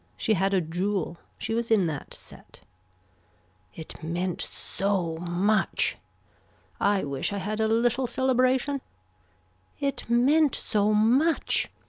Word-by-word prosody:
She 220 - +1
had 195 0 +1
a 185 - +3
jewel. 175 +1 -2 0.2
She - - -3
was 235 0 -1
in 215 -5 +4
that 155 -4 -5
set. - - -12 1.1
It 160 0 -8
meant 175 +3 -2
so 185 -5 -2
much. 180 +5 +1 0.8
I 200 -1 +2
wish 140 +3 -2
I 200 - -3
had 210 +3 -3
a 220 - +2
little 240 +3 +2
celebration. 260 +2 +1 1.0
It 275 -4 -2
meant 275 +5 +4
so 210 0 +1
much. 250 +10 +2
210 Hz, 120 wpm, -27 LUFS, 180-245 Hz, 1.1 s, in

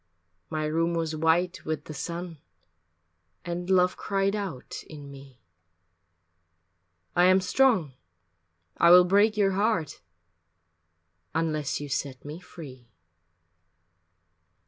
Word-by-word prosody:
My 155 -1 -2
room 165 +2 0
was 165 -1 -2
white 165 +3 +1
with 155 -2 -3
the 155 - -8
sun 170 +2 -6 1.1
And 175 +1 -4
Love 180 -1 +3
cried 195 +1 -1
out 195 -11 -6
in 145 -2 -10
me, 135 -4 -14 1.7
"I 175 - +5
am 185 +1 +5
strong, 190 - +2 0.8
I 170 - +5
will 180 +1 +8
break 205 +4 +3
your 200 -2 +3
heart 190 - -1 1.3
Unless 155 -3 -1
you 145 - -6
set 135 -1 -4
me 150 +3 -7
free." 130 -9 -12
165 Hz, 105 wpm, -27 LUFS, 150-185 Hz, 1.7 s, will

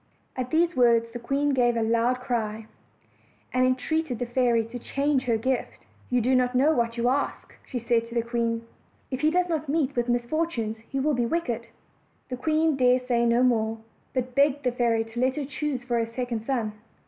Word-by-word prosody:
At 255 -1 -3
these 340 +3 +2
words 235 -2 +3
the 240 - -6
queen 280 +4 0
gave 240 -2 +2
a 225 - +1
loud 235 +3 +1
cry, 225 -3 -2 0.9
and 255 0 +3
entreated 260 +2 -1
the 245 - -2
fairy 240 -2 +2
to 240 +2 -7
change 275 +1 0
her 230 -2 +2
gift. 255 +3 -2 0.2
"You 250 -1 +2
do 255 +3 +2
not 250 0 +2
know 285 +5 +4
what 235 -3 0
you 235 +1 +1
ask," 275 +3 -1 0.2
said 245 -3 -4
she 235 -1 +4
to 230 +1 -10
the 235 - +1
queen; 230 -1 -1 0.5
"if 260 - -2
he 305 - +4
does 360 +2 +1
not 315 -4 -2
meet 290 -2 0
with 240 0 0
misfortunes 240 -2 -1
he 270 - -2
will 295 +3 +1
be 240 -2 +1
wicked." 240 -7 -2 0.6
The 255 - -3
queen 315 +3 +2
durst 250 0 +3
say 235 -1 +3
no 235 +2 +3
more, 225 -3 +2 0.4
but 255 -1 -2
begged 285 +1 +3
the 250 - +1
fairy 235 -2 +1
to 225 +1 -8
let 260 +1 +2
her 295 -2 -3
choose 275 -2 -3
for 240 -2 0
her - - -4
second 235 -2 -4
son. 235 -6 -1
250 Hz, 205 wpm, -26 LUFS, 235-275 Hz, 0.9 s, know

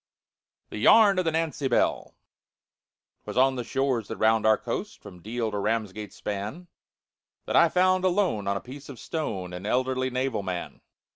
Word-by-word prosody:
_ - - -48
THE - - -5
YARN 205 -4 +6
OF 185 - 0
THE 165 - +2
"NANCY 160 -4 -1
BELL" 120 - 0 1.1
'Twas - - -7
on 130 +1 +4
the 125 - -3
shores 130 -3 -1
that 110 - -6
round 110 0 +3
our 110 -1 +5
coast - - -5
From 90 - -12
Deal 115 +2 -3
to 105 - -2
Ramsgate 105 -1 -2
span, 105 - -5 0.8
That - - -2
I - - +6
found 185 0 +2
alone 180 - +1
on 100 0 +1
a - - -7
piece 135 +3 -11
of 135 - -9
stone 100 - -4
An 90 +3 -6
elderly 130 +2 0
naval 130 -3 -1
man. 90 -3 -5
125 Hz, 175 wpm, -26 LUFS, 105-145 Hz, 1.1 s, YARN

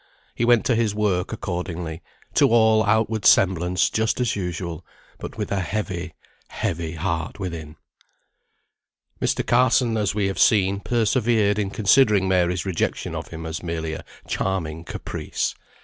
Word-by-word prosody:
He 120 - 0
went 120 -2 +4
to 125 - +3
his 110 -3 +1
work, 100 -4 0
accordingly, 85 -3 -4 0.3
to - - +4
all 110 -1 +4
outward 110 0 +1
semblance 90 -1 +4
just 110 +2 0
as 125 -2 0
usual; 90 -3 -4 0.4
but - - -8
with - - -4
a 100 - +1
heavy, 90 -2 -3 0.3
heavy 80 -1 -3
heart 85 +1 -3
within. 85 -5 -6 1.5
Mr. - - 0
Carson, 120 -1 +3
as 105 -1 0
we 105 -2 +1
have 95 0 -2
seen, 100 -2 +4
persevered 110 -2 +1
in 100 -2 -1
considering 105 -1 +4
Mary's 90 -1 +1
rejection 95 -4 -2
of - - -5
him 80 0 -8
as 80 0 -4
merely 80 -2 -3
a - - -7 0.2
"charming 85 -4 -2
caprice." - - -3
95 Hz, 145 wpm, -23 LUFS, 85-110 Hz, 1.5 s, went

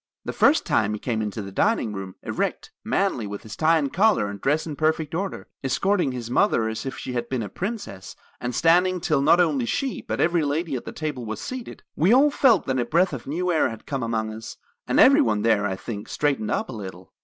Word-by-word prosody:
The - - -3
first 300 - +4
time 110 - +1
he - - -7
came 115 -2 -2
into 105 0 -4
the 95 - -8
dining 160 - +1
room, 95 -2 -7
erect, - - -3
manly, 190 - 0
with 100 0 -7
his 110 - -8
tie 160 +1 +3
and 140 -4 -2
collar 200 - +3
and 100 -1 -9
dress 150 +3 +1
in 155 -3 -5
perfect 155 +1 0
order, 190 +3 -4 0.2
escorting 175 +4 +1
his 125 -2 -5
mother 125 - +2
as 110 +4 -4
if 135 - -5
she 130 - -6
had 120 -1 -3
been 130 -3 -1
a 105 - -6
princess, 185 - -6 0.2
and 125 0 -4
standing 180 +3 +3
till 155 -4 +1
not 165 +5 +5
only 150 -8 +2
she, 275 - -2
but - - -4
every 170 -1 +2
lady 150 +1 -1
at 125 - -5
the - - -6
table 150 -5 -4
was 110 -1 -5
seated, 255 -2 -7
we 175 +7 +3
all 280 +4 +5
felt 265 -4 +4
that 130 -1 0
a 120 - 0
breath 175 +1 +2
of 130 -2 -7
new 175 +5 -1
air 160 -5 +2
had 115 -1 -9
come 135 -2 -3
among 110 -2 -2
us, 110 0 -9 0.3
and - - +2
every 275 +3 +7
one 105 - +1
there, 110 -3 +3
I 95 - -2
think, 105 +1 -7
straightened 140 -8 0
up - - -1
a - - -6
little. 95 -4 -9
135 Hz, 235 wpm, -24 LUFS, 110-175 Hz, 0.3 s, every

